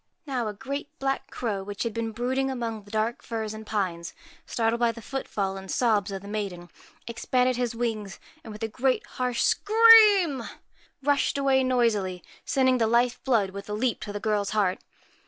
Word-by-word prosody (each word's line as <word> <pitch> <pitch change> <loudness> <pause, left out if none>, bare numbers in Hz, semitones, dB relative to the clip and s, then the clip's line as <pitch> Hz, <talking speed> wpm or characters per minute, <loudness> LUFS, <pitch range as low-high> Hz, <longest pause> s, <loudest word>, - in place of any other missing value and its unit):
Now 255 -6 -2
a 210 - -3
great 280 +6 -5
black 270 0 -2
crow, 210 -5 -3
which 200 0 -5
had 230 -2 -3
been 230 0 -3
brooding 255 +4 -1
among 230 -5 -4
dark 220 +3 -2
firs 220 -2 -4
and 215 0 -9
pines, 185 - -3 0.3
startled 230 0 0
by 235 -1 +3
the 230 - -11
footfall 205 -6 -3
and 190 0 -9
sobs 210 -4 +1
of 195 0 -6
the - - -9
maiden, 195 -5 -5 0.3
expanded 250 +2 0
his 245 -1 -2
wings, 220 -4 -3 0.2
and, 225 - -9
with 210 +1 -8
a 250 +4 0
harsh 250 -1 -1
scream, 425 - +6 0.6
rushed 285 0 +1
away, 270 -1 +3
noisily, 220 -8 +1 0.2
sending 260 -2 +2
the 225 - +3
life 235 +2 +1
blood 220 -7 +2
with 200 +1 -8
a - - -3
leap 235 +3 0
to 205 - -6
the 205 - -4
girl's 205 -1 0
heart. 190 -3 +1
230 Hz, 175 wpm, -26 LUFS, 205-255 Hz, 0.6 s, scream